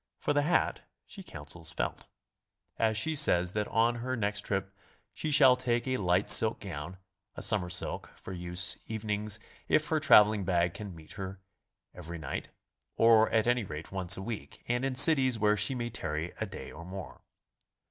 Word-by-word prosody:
For - - -2
tihe 145 0 +1
hat 175 - 0 0.2
she 200 - -11
counsels 80 - -7
felt. - - -5 0.7
And 110 -1 0
she 160 +8 0
says 90 - +4
'that 105 -1 -2
on 115 +2 +1
her 130 +2 -4
next 105 -1 -1
trip 95 -1 -4 0.4
she 155 - -4
shall 140 -3 +6
take 120 -1 -2
a 130 0 -1
light 90 -1 0
silk - - +7
gown, 75 +6 -7 0.4
a - - -3
summer 100 -5 +2
silk, - - -3
for 95 - -10
use 90 0 -1
evenings 105 -1 -3 0.3
if 155 0 +1
her 160 - +1
traveling 105 -8 +5
bag 85 -2 0
can 100 -2 -9
meet 80 -1 -15
her 95 -1 -7 0.6
every 85 -1 -9
night, 80 -4 -6 0.5
or 115 -1 +5
at 110 -1 +1
any 120 0 +1
rate 75 -4 -8
once 95 -1 +3
a 95 - -6
week, 115 0 -8
and 120 +1 -1
in 135 -1 -2
cities 130 -3 +6
where 105 -1 +2
she 105 +6 -1
may 120 -1 -4
tarry 80 -5 -5
a - - -3
day - - -10
or 85 - -11
more. 90 -4 -9
105 Hz, 180 wpm, -29 LUFS, 90-120 Hz, 0.7 s, silk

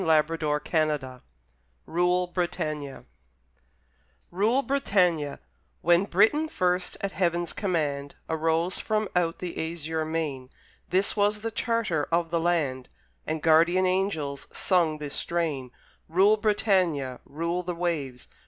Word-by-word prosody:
[Illustration: 155 -2 +2
PIONEERS] 150 -6 -1 0.6
RULE, 180 +2 +1
BRITANNIA 155 -5 -3 2.8
When 175 +3 +4
Britain 225 - +3
first, 180 - 0
at 200 - -2
Heaven's 175 -2 0
command, 150 -7 -2
Arose 165 +2 0
from 215 -1 0
out 170 -2 +1
the 165 -2 -4
azure 160 -1 -3
main, 155 -5 -3 0.4
This 190 +3 +2
was 210 0 +1
the 225 +1 -3
charter 220 -10 0
of 165 0 +1
the 170 - +1
land, 150 -7 0 0.4
And 155 -1 -2
guardian 170 +3 +5
angels 185 -7 -1
sung 170 -5 +1
this 145 -1 -6
strain: 155 -7 -2 0.4
Rule, 195 +6 +5
Britannia, 185 - +1
rule 170 +4 -2
the 180 0 -4
waves! 150 -8 -3
170 Hz, 110 wpm, -27 LUFS, 155-185 Hz, 2.8 s, guardian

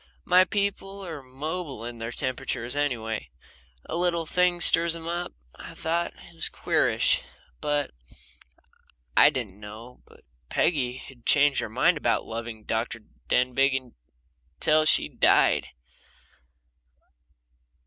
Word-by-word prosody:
My 185 +1 +5
people 200 0 -3
are 160 -5 -7
mobile 140 0 -6
in 120 -1 -8
their 115 +1 -5
temperatures, 130 -1 -3
anyway 115 - -2 0.6
a - - -3
little 170 -1 +1
thing 180 +1 +1
stirs 170 -1 +8
them 165 0 -8
up. 175 +1 -3 0.2
I - - -11
thought 170 +2 -2
it 175 - -16
was 165 - -2
queerish, - - +1 0.4
but 145 -1 -1 1.2
I - - +7
didn't 120 -9 -6
know 110 +4 -11
but - - -20 0.3
Peggy 130 -7 0
had 125 -3 -13
changed 145 -1 +4
her - - -3
mind 150 +9 +2
about 120 -6 0
loving 115 -1 -7
Dr. 115 +1 -3 0.3
Denbigh 130 0 +1 0.7
till 155 0 +3
she - - +3
died. - - +3
140 Hz, 120 wpm, -26 LUFS, 120-170 Hz, 1.2 s, stirs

